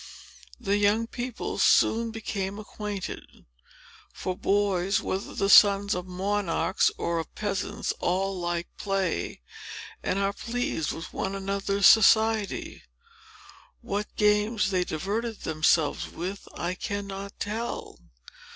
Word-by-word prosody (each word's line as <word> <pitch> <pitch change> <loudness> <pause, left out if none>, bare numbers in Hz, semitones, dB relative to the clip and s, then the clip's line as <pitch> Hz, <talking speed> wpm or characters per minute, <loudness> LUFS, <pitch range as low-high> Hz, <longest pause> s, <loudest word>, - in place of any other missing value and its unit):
The 200 +1 +1
young 205 +2 +3
people 245 +1 -5
soon 230 +1 +4
became 200 -3 -4
acquainted; 210 -2 -7 0.7
for 185 - -4
boys, 195 -1 +1
whether 190 +1 -4
the 195 - +1
sons 200 0 +7
of 180 0 -4
monarchs 190 0 +1
or 170 -1 -1
of 165 - -7
peasants, 205 -3 -2
all 190 +2 0
like 175 0 -2
play, 190 - -2 0.6
and - - -1
are 200 0 +1
pleased 235 -10 -2
with 165 - -7
one 195 +1 -2
another's 195 0 0
society. 220 -1 +4 1.0
What 210 -3 -4
games 210 -1 +2
they 185 -1 +2
diverted 210 +8 -3
themselves 155 -1 +1
with, 190 +4 -6
I 175 +1 -2
cannot 200 +1 -5
tell. 220 - -4
200 Hz, 115 wpm, -27 LUFS, 185-210 Hz, 1.0 s, sons